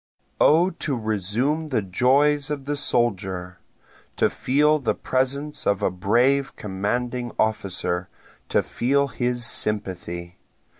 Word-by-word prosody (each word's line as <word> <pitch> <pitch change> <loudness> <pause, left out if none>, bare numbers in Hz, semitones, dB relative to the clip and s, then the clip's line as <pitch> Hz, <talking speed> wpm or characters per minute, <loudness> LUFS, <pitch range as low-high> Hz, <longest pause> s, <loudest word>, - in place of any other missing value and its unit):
O 170 +5 +5
to 150 -6 -2
resume 110 - 0
the 125 -8 0
joys 135 +9 +2
of 145 -2 -4
the 145 +1 -1
soldier! 95 -9 -1 0.6
To - - +2
feel 150 +3 +2
the 135 - -1
presence 140 +3 -2
of 100 -2 +1
a - - +2
brave 125 +9 +1
commanding 120 +5 -3
officer 95 -4 -1 0.4
to - - +2
feel 140 +3 0
his 120 -1 -1
sympathy! 90 -6 -1
120 Hz, 115 wpm, -23 LUFS, 100-140 Hz, 0.6 s, O